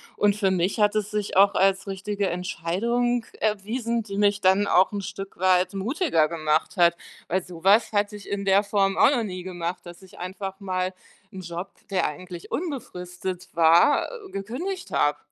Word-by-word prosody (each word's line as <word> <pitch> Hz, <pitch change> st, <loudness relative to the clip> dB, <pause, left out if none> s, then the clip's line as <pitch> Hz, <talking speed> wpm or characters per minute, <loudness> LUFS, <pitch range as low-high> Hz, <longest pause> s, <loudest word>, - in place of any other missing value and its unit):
und 205 Hz, -1 st, +2 dB
für 195 Hz, -2 st, +2 dB
mich 185 Hz, +4 st, 0 dB
hat 210 Hz, 0 st, +3 dB
es 210 Hz, 0 st, -1 dB
sich 210 Hz, -1 st, -3 dB
auch 200 Hz, +1 st, +6 dB
als 195 Hz, 0 st, +2 dB
richtige 200 Hz, +1 st, -3 dB
Entscheidung 215 Hz, +7 st, -1 dB, 0.2 s
erwiesen, 225 Hz, +3 st, -1 dB
die 200 Hz, -2 st, -6 dB
mich 205 Hz, 0 st, +3 dB
dann 190 Hz, +2 st, +4 dB
auch 190 Hz, +2 st, +4 dB
'n 200 Hz, -, -2 dB
Stück 195 Hz, +1 st, -7 dB
weit 185 Hz, 0 st, +3 dB
mutiger 200 Hz, -, +1 dB
gemacht 155 Hz, +1 st, 0 dB
hat, 170 Hz, -1 st, +5 dB, 0.3 s
weil 185 Hz, +1 st, 0 dB
so 175 Hz, -2 st, -11 dB
was 205 Hz, +4 st, +5 dB
hatte 205 Hz, 0 st, 0 dB
ich 205 Hz, -, -11 dB
in 200 Hz, 0 st, -3 dB
der 195 Hz, +1 st, +4 dB
Form 195 Hz, -1 st, +1 dB
auch -, -, +6 dB
noch 245 Hz, -5 st, +1 dB
nie 185 Hz, -4 st, -5 dB
gemacht, 175 Hz, -1 st, -4 dB
dass 175 Hz, 0 st, -12 dB
ich 190 Hz, -2 st, -16 dB
einfach 190 Hz, +1 st, -6 dB
mal 185 Hz, -1 st, -2 dB, 0.4 s
'n 190 Hz, -, -7 dB
Job, 175 Hz, +2 st, -6 dB, 0.2 s
der 190 Hz, -2 st, +1 dB
eigentlich 175 Hz, +3 st, -9 dB
unbefristet 180 Hz, -, -5 dB
war, 170 Hz, -, +5 dB, 0.2 s
gekündigt 280 Hz, -, -5 dB
habe. 145 Hz, 0 st, +2 dB
195 Hz, 175 wpm, -25 LUFS, 180-210 Hz, 0.4 s, auch